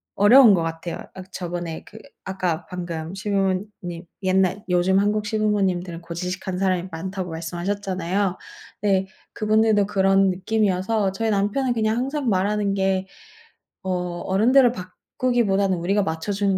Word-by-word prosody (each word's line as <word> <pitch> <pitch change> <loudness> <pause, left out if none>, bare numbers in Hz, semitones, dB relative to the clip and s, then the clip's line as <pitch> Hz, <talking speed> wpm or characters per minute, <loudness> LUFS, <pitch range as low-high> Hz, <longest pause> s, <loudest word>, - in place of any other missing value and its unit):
어려운 230 +2 +7
것 175 - +2
같아요. 165 +1 -4 0.2
아 185 - -7
그 190 - -24
저번에 175 -2 -5
그 220 - -14 0.3
아까 180 -3 -2
방금 175 -1 -5
시부모님 195 -3 -2 0.2
옛날 190 +1 +1
요즘 180 +2 +3
한국 210 +1 +1
시부모님들은 195 -5 0
고지식한 180 +2 -4
사람이 185 -1 0
많다고 185 +2 -5
말씀하셨잖아요. 185 +3 -2 0.4
네, 195 -2 +2 0.3
그분들도 215 -1 +2
그런 195 -1 +3
느낌이어서 195 +1 0
저희 220 +3 -1
남편은 210 +6 +1
그냥 220 0 0
항상 270 +1 -1
말하는 200 +1 +1
게 190 -1 0 0.8
어 180 -2 -2
"어른들을 240 +6 +4
바꾸기보다는 195 0 -1
우리가 195 +4 +1
맞춰주는 195 +4 -1
190 Hz, 335 characters per minute, -23 LUFS, 180-210 Hz, 0.8 s, 어려운